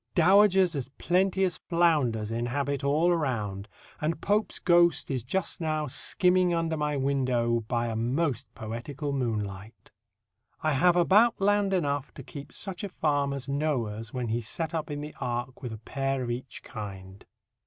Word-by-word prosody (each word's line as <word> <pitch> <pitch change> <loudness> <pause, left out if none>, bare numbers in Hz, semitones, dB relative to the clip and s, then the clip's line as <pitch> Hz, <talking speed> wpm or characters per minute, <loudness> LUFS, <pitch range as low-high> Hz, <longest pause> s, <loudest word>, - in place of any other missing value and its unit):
Dowagers 190 0 +5
as 135 -2 -3
plenty 190 +2 +2
as 180 -3 0
flounders 145 -11 +1
inhabit 140 +5 -2
all 150 +5 +3
around, 110 - -1 0.3
and 155 +1 -1
Pope's 210 +4 0
ghost 175 -3 +3
is 130 -2 -1
just 175 - -2
now 155 -1 0
skimming 180 +5 +2
under 165 -1 0
my 150 -1 -1
window 130 -4 +1
by 120 -1 0
a 115 -1 -3
most 125 +2 -1
poetical 120 +6 -5
moonlight. 105 -5 -4 0.7
I 155 - +2
have 175 +6 +4
about 205 +7 +4
land 205 0 +2
enough 145 -6 0
to - - -9
keep 140 -1 -9
such 190 0 -5
a 200 - -3
farm 145 -5 0
as 140 -1 -4
Noah's 120 -7 -2
when 125 -3 -3
he 115 +2 0
set 160 +9 -3
up 160 -1 -2
in 145 0 -4
the 150 +1 -7
Ark 120 +1 -3
with 125 - -5
a 110 - -6
pair 135 +4 -2
of 120 - -3
each 125 +2 -6
kind. 95 -3 -8
140 Hz, 165 wpm, -28 LUFS, 120-170 Hz, 0.7 s, Dowagers